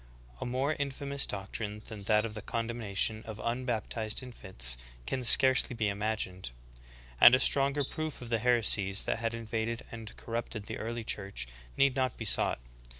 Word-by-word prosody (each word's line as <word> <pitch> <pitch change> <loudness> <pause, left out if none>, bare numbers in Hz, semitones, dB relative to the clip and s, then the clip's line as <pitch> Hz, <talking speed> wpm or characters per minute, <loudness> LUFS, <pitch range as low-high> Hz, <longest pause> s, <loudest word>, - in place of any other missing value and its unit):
^ - - -21
A - - -3
more 130 +5 -1
infamous 140 0 -2
doctrine 105 +1 -5
than 105 -3 -9
that 105 +1 +2
of 110 - -5
the 110 - -6
condemnation 110 -2 -2
of 110 -1 -7
un 120 +3 -3
baptized 110 -1 -1
infants 95 - -2 0.3
can 130 - -3
scarcely 130 0 +6
be 110 -2 0
imagined, 100 - -3 0.7
and 125 - +9
a - - +1
stronger 140 +2 +2
proof 155 +2 -5
of 120 -1 -10
the 115 - +1
heresies 105 -4 +4
that - - -2
had 115 0 -2
invaded 115 +1 -4
and 115 -2 -9
corrupted 115 -2 -5
the - - -6
early 115 +1 -4
Church 100 - -4 0.3
need 135 -1 +3
not 130 -2 -1
be 115 - -6
sought. 95 - +4
115 Hz, 170 wpm, -30 LUFS, 105-125 Hz, 0.7 s, and